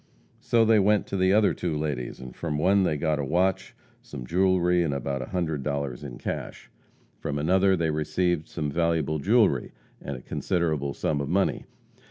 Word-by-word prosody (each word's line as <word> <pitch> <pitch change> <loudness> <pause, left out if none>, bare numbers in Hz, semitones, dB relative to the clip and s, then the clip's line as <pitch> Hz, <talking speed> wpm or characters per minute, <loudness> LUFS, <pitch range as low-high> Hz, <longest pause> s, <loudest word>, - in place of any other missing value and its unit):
So 115 -1 +2
they 110 -1 +5
went 105 +1 +3
to - - -5
the 95 0 +3
other 105 0 +4
two 85 -4 -2
ladies, 75 -5 -3
and 65 -1 -10
from 80 -3 -3
one 95 +6 +3
they 80 -5 +1
got 75 0 0
a - - -1
watch, 95 +6 0 0.3
some 60 - -8
jewelry, 90 +2 +2
and 75 -5 0
about 70 0 -3
one 65 - -7
hundred 80 -6 -2
dollars 70 -2 -3
in 65 -4 -7
cash. - - -6 0.5
From 75 - -3
another 95 +5 +3
they 80 -2 0
received 80 +2 0
some 75 -3 -3
valuable 80 -1 0
jewelry, 100 - +2 0.3
and 70 -1 -5
a - - -11
considerable 80 -6 -1
sum 70 -2 -1
of 70 - -4
money. 95 +2 0
80 Hz, 185 wpm, -26 LUFS, 70-95 Hz, 0.5 s, they